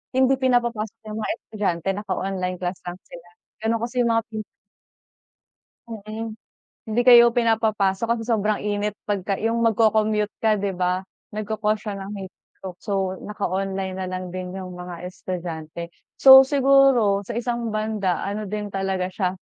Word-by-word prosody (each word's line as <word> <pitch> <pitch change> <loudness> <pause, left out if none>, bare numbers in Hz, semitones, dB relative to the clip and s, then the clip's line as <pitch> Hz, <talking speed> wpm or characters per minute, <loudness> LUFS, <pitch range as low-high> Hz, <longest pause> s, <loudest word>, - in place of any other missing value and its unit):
hindi 260 0 +4
pinapapasok 240 -4 0
'yung 215 +1 -5
mga - - -1
estudyante, 195 -5 -2
naka-online 190 -2 -3
class 180 0 -3
lang 175 +1 -6
sila. 175 0 -13 0.4
Gano'n 225 0 +1
kasi 240 +2 -4
'yung 235 -1 +3
mga 225 - +2
pin 215 -1 -4 1.5
Mm. 220 +1 -6 0.5
Hindi 220 +2 -1
kayo 240 -1 +8
pinapapasok 220 -3 +1
kasi 225 -1 -4
sobrang 215 -2 +1
init 205 0 -1 0.2
pagka 195 -1 -1
'yung 230 +1 0
magko-commute 215 -1 +2
ka 220 -1 +4
'di 195 -2 -2
ba, 180 0 0 0.3
nagko-cause 215 0 -1
siya 205 -2 -4
ng 195 +1 -7
heat 190 - -9 0.3
stroke, 185 -2 -8
so 190 -2 -2
naka-online 195 -2 -2
na 190 - -3
lang 185 0 -5
din 185 0 -6
'yung 185 -1 -7
mga 180 -1 -8
estudyante. 170 -2 -6 0.3
So 265 0 +10
siguro 270 -8 +4
sa 235 - -5
isang 235 -1 -2
banda, 215 -4 -1
ano 205 +2 -3
din 210 +1 -4
talaga 190 -1 -2
siya, 185 -1 -1
210 Hz, 150 wpm, -23 LUFS, 190-225 Hz, 1.5 s, So